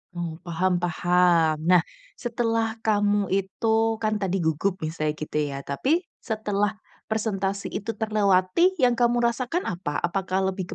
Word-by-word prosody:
Oh, 170 -2 -4
paham 180 +1 0
paham. 175 -2 +3 0.2
Nah, 180 - +7 0.4
setelah 230 -2 -1
kamu 205 -2 +2
itu 220 +3 +1
kan 215 -1 +1
tadi 190 -2 -1
gugup 160 +5 0
misalnya 155 -1 -2
gitu 150 0 -5
ya, 140 -2 -2
tapi 285 - 0 0.2
setelah 210 -2 -1 0.3
presentasi 200 -3 -1
itu 225 +3 -3
terlewati 215 - +2
yang 250 -7 +3
kamu 240 0 +3
rasakan 250 +8 0
apa? 170 -5 -3
Apakah 190 +1 0
lebih 185 -2 -5
195 Hz, 135 wpm, -25 LUFS, 175-225 Hz, 0.4 s, Nah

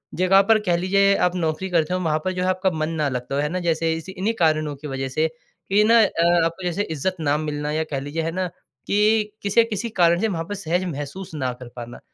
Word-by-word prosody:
जगह 185 +2 +5
पर 220 -1 +6
कह 175 - +2
लीजिए 195 +2 +3
आप 180 0 +1
नौकरी 165 +2 -2
करते 170 -1 +1
हो, 185 - 0
वहाँ 155 -3 0
पर 185 - +1
जो 180 - -3
है 185 - +1
आपका 185 +1 +1
मन 155 -1 -2
ना 145 - +2
लगता 125 +1 -4
हो, 145 - +1
है 150 - -1
ना? 185 +2 -2
जैसे 165 -1 0
इसी 165 +3 -6
इन्हीं 195 +4 -1
कारणों 155 -2 +2
की 150 +2 -9
वजह 135 -1 -3
से 155 +5 +1 0.4
कि 205 +2 +4
ना 230 +2 +6
अ, 170 -4 +3
आपको 170 +3 -3
जैसे 180 +3 -1
इज़्ज़त 160 +2 -2
ना 150 -2 +1
मिलना, 150 -1 -3
या 155 +1 0
कह 140 - -1
लीजिए, 145 +4 -4
है 165 - -2
ना, 185 +1 -2 0.4
कि 210 +1 +2
किसी 205 +3 +3
अ, - - +4
किसी 215 +2 -3
कारण 170 0 +5
से 225 - +2
वहाँ 165 -6 -2
पर 205 - -5
सहज 180 -1 -1
महसूस 150 +6 -7
ना 130 -3 -1
कर 125 0 -11
पाना। 120 0 -8
170 Hz, 255 wpm, -22 LUFS, 155-190 Hz, 0.4 s, पर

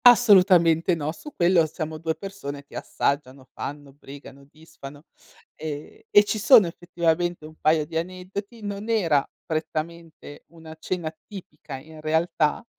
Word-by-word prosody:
Assolutamente 185 -8 +6
no. 155 -1 -3
Su 295 - -11
quello 175 -1 +4
siamo 155 0 -5
2 160 0 -2
persone 145 -8 -7
che - - -15
assaggiano, 140 -2 -2
fanno, 145 -1 -7
brigano, 140 -1 -13
disfano 150 -1 -13 0.5
e 150 -1 -8
e 205 - +7
ci 215 +1 -2
sono 225 -1 +7
effettivamente 175 -1 -1
un 155 0 -12
paio 155 0 +3
di 160 +1 -5
aneddoti. 185 +6 -6
Non 205 +2 -5
era 165 -11 +3 0.2
prettamente 160 -1 -5
una 160 0 -12
cena 165 -2 -4
tipica, 155 -7 -9
in 155 +3 -13
realtà, 160 +2 0
160 Hz, 135 wpm, -24 LUFS, 150-180 Hz, 0.5 s, e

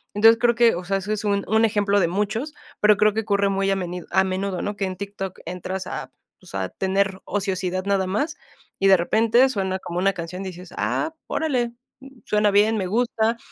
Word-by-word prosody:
Entonces, 225 +2 +6
creo 240 -1 +4
que, 235 0 +5
o 180 - -5
sea, 195 +2 0
eso 200 +2 -4
es 215 0 -3
un 200 -1 0
un 220 +2 +4
ejemplo 205 -2 +2
de 170 - +3
muchos, 210 - -2 0.3
pero 210 -1 +5
creo 210 0 +4
que 220 - 0
ocurre 200 -2 +1
muy 195 0 0
a - - +2
menido 180 -2 -5
a 190 +1 +4
menudo, 190 0 -2
¿no? 205 - -3
Que 200 -1 -2
en 185 -1 -5
TikTok 195 -1 -6
entras 185 +1 -5
a, - - -6 0.3
pues, - - -12
a 95 -1 -2
tener 195 0 -1
ociosidad 185 -2 -2
nada 195 -2 +1
más, 290 - -1 0.4
y 195 - +3
de 190 -1 +7
repente 230 +8 +3
suena 190 -4 -2
como 175 -1 -4
una 195 +1 +2
canción 175 +1 -6
y 190 - -5
dices: 180 0 -11
"Ah, 320 0 -1
órale, 250 -7 -1 0.5
suena 210 0 +2
bien, 210 +2 +4
me 190 -3 -1
gusta", 230 +1 +1
200 Hz, 215 wpm, -23 LUFS, 190-220 Hz, 0.5 s, de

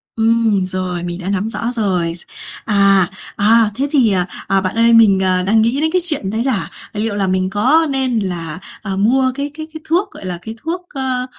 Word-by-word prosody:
Ừm, 225 -3 +2
rồi, 185 -1 -3
mình 175 +1 -5
đã 185 - -5
nắm 200 +2 -1
rõ 230 +1 -3
rồi. 180 -7 0 0.5
À, 195 -3 +4 0.3
à, 215 +1 +4
thế 275 +4 -1
thì, 255 -8 +4
ờ, 180 -2 +2 0.2
à, 195 0 +2
bạn 185 +2 -3
ơi 230 0 +4
mình, 210 -4 +6
ờ, 185 -1 +1
đang 220 +3 +3
nghĩ 235 +5 +1
đến 315 - +1
cái 365 +1 +2
chuyện 300 - 0
đấy 220 +3 -1
là, 255 -7 -1 0.2
à, 210 - -4
liệu 220 -1 -1
là 195 -2 0
mình 185 0 0
có 265 +11 +3
nên 260 -4 0
là, 175 -4 -4 0.2
ờ, 195 -3 -4
mua 255 +5 +2
cái 285 +1 -3
cái 315 +1 -7
cái 315 - -8
thuốc, 365 +5 +1
gọi - - -10
là, 180 -2 -4
cái 220 +4 -7
thuốc, 335 +7 -4
ơ, 260 -2 -2
220 Hz, 220 wpm, -17 LUFS, 190-260 Hz, 0.5 s, mình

